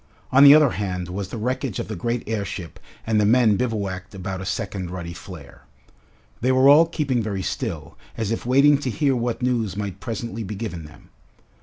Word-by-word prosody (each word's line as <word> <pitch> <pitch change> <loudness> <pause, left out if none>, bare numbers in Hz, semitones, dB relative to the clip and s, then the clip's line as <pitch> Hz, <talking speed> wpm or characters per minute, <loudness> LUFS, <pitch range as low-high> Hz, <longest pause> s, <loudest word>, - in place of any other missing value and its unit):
On 135 +2 +6
the 145 +1 +10
other 150 -4 +5
hand 90 -3 -4
was 95 +1 -5
the 115 - -6
wreckage 125 0 -2
of - - -4
the - - -5
great 115 +7 -3
airship 100 -5 -5 0.3
and 110 -1 +2
the - - +3
men 110 0 +4
bivouacked 100 -5 -3
about 95 0 -5
a 95 - -6
second 95 -3 -4
ruddy 85 -1 -6
flare. 80 -4 -12 0.7
They 130 +3 +2
were 130 +1 +4
all 155 +3 +7
keeping 140 -7 -1
very 100 -3 -3
still, 90 - -5 0.2
as 110 -1 -2
if 115 - -2
waiting 140 +3 +4
to 135 - -3
hear 140 +1 +1
what 120 +1 -2
news 115 -6 -1
might 100 -2 -4
presently 115 +2 -5
be 105 0 -5
given 95 -7 -6
them. 75 - -16
110 Hz, 195 wpm, -23 LUFS, 95-125 Hz, 0.7 s, the